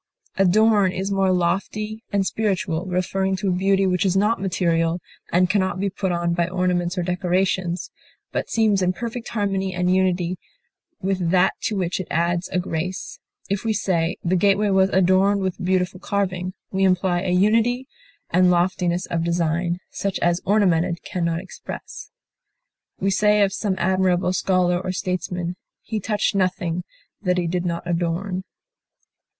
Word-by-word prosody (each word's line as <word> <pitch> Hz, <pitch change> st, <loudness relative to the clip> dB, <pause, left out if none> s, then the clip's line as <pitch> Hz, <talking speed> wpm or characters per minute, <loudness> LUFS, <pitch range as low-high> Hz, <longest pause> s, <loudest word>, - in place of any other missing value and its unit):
Adorn 200 Hz, +1 st, +4 dB
is 190 Hz, +2 st, -3 dB
more 195 Hz, -1 st, +2 dB
lofty 210 Hz, +5 st, -1 dB
and 200 Hz, -1 st, +1 dB
spiritual, 190 Hz, -5 st, -1 dB
referring 190 Hz, +1 st, 0 dB
to 190 Hz, +1 st, -1 dB
a 180 Hz, -, +1 dB
beauty 195 Hz, +1 st, +2 dB
which 180 Hz, 0 st, +1 dB
is 190 Hz, -1 st, +2 dB
not 210 Hz, +1 st, +2 dB
material, 170 Hz, -3 st, +1 dB, 0.3 s
and 180 Hz, +1 st, +4 dB
can 200 Hz, +2 st, +2 dB
not 185 Hz, -1 st, -2 dB
be 200 Hz, 0 st, -1 dB
put 190 Hz, -1 st, -2 dB
on 170 Hz, 0 st, 0 dB
by 170 Hz, 0 st, +1 dB
ornaments 180 Hz, -1 st, 0 dB
or 180 Hz, -, 0 dB
decorations, 180 Hz, 0 st, -1 dB, 0.4 s
but -, -, -3 dB
seems 215 Hz, -4 st, +2 dB
in 180 Hz, 0 st, +2 dB
perfect 235 Hz, +2 st, -5 dB
harmony 195 Hz, -3 st, -1 dB
and 180 Hz, 0 st, +2 dB
unity 185 Hz, -1 st, +1 dB, 0.6 s
with 185 Hz, -3 st, 0 dB
that 180 Hz, 0 st, +4 dB
to 215 Hz, -, -1 dB
which 185 Hz, -2 st, -1 dB
it 185 Hz, -, -4 dB
adds 170 Hz, +2 st, 0 dB
a -, -, -1 dB
grace; 180 Hz, +1 st, -3 dB, 0.3 s
if 200 Hz, +2 st, -2 dB
we 225 Hz, -1 st, +1 dB
say, 175 Hz, -5 st, 0 dB
the 180 Hz, +2 st, +1 dB
gateway 200 Hz, +2 st, +3 dB
was 190 Hz, 0 st, +4 dB
adorned 190 Hz, +2 st, +3 dB
with 190 Hz, 0 st, -3 dB
beautiful 185 Hz, 0 st, 0 dB
carving, 185 Hz, -2 st, -2 dB, 0.2 s
we 195 Hz, 0 st, 0 dB
imply 185 Hz, -1 st, +2 dB
a 190 Hz, -, -2 dB
unity 225 Hz, +7 st, +2 dB, 0.4 s
and 180 Hz, +1 st, +4 dB
loftiness 180 Hz, 0 st, +1 dB
of 165 Hz, -1 st, -2 dB
design 170 Hz, +1 st, 0 dB
such 200 Hz, -1 st, -2 dB
as 175 Hz, +1 st, +1 dB
ornamented 180 Hz, -4 st, +2 dB
can 180 Hz, -, -3 dB
not 170 Hz, 0 st, 0 dB
express. 190 Hz, +1 st, -9 dB, 0.9 s
We 195 Hz, +1 st, +1 dB
say 210 Hz, +1 st, +4 dB
of 195 Hz, -1 st, +1 dB
some 200 Hz, -1 st, -1 dB
admirable 185 Hz, 0 st, +1 dB
scholar 180 Hz, -2 st, +2 dB
or 185 Hz, -1 st, -3 dB
statesman, 180 Hz, -1 st, -3 dB, 0.3 s
"he 220 Hz, -, -3 dB
touched 210 Hz, +1 st, 0 dB
nothing 180 Hz, -2 st, -1 dB, 0.4 s
that 180 Hz, -3 st, +1 dB
he 175 Hz, -, 0 dB
did 175 Hz, +1 st, -1 dB
not 170 Hz, 0 st, -2 dB
adorn." 175 Hz, +2 st, -2 dB
185 Hz, 160 wpm, -22 LUFS, 175-195 Hz, 0.9 s, Adorn